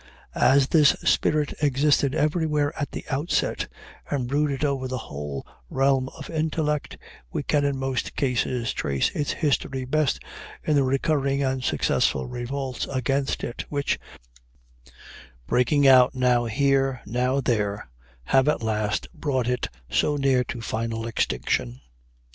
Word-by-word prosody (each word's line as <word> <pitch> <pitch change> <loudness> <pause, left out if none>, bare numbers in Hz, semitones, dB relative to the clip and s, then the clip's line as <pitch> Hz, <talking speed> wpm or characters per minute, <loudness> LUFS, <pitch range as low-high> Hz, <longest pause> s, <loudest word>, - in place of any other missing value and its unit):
As 135 0 +4
this 150 -3 +5
spirit 150 -1 +2
existed 145 0 +2
everywhere 150 -1 +1
at 145 -3 -3
the - - -6
outset, 145 +6 0 0.4
and 130 -4 -1
brooded 145 +1 0
over 135 -2 -1
the 130 0 -3
whole 70 - -6 0.2
realm 135 -1 +2
of - - -8
intellect, 155 -2 -1 0.3
we - - -2
can 145 +1 +1
in 140 -1 0
most 135 -1 -2
cases 125 -3 0
trace 70 -1 0
its 145 - -2
history 135 -4 -1
best 150 +2 +1 0.4
in 150 - +1
the 140 - +4
recurring 140 +1 +1
and 130 -1 -1
successful 65 - +1
revolts 130 - -4
against 135 +1 -1
it, 120 - -4
which, 145 -1 -1 1.5
breaking 130 - +3
out 130 +1 +6
now 125 -2 +2
here, 135 +1 +1
now 125 +5 0
there, 105 -5 -1 0.4
have 135 - +3
at 150 - +1
last 110 -1 -1
brought 140 -7 -1
it 125 0 0 0.2
so 145 - +1
near 135 -2 +3
to 120 +1 -6
final 115 0 -3
extinction. 65 - -1
135 Hz, 135 wpm, -25 LUFS, 120-145 Hz, 1.5 s, out